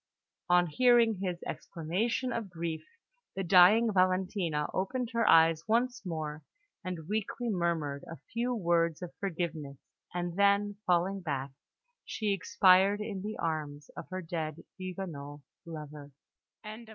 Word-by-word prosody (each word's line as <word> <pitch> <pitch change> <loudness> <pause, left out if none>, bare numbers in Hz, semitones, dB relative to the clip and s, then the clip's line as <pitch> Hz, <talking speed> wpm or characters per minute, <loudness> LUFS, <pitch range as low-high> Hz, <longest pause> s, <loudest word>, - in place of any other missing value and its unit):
On 175 0 +5
hearing 230 +4 +4
his 180 -3 -3
exclamation 220 +10 -2
of 225 -4 -4
grief, 165 -2 -4 0.5
the 195 - -2
dying 195 +6 +6
Valentina 185 -4 +1
opened 235 +5 -2
her 230 -1 +2
eyes 165 0 +5
once 245 +2 +1
more, 155 -4 -4 0.4
and 175 -4 -5
weakly 220 +3 -2
murmured 165 -6 -1
a 165 - -7 0.2
few 240 +2 0
words 170 -4 +1
of 175 - -7
forgiveness; 160 -7 -4 0.3
and 175 -1 -3
then, 200 0 +3
falling 185 +2 +2
back, 140 -5 -3 0.5
she 210 -3 -1
expired 195 0 +4
in 210 -2 -4
the 215 +2 -5
arms 150 -3 -3
of - - -8
her 185 0 -5
dead 160 -2 -4
Huguenot 170 -6 -7 0.3
lover! 150 -3 -8
180 Hz, 125 wpm, -31 LUFS, 160-205 Hz, 0.5 s, dying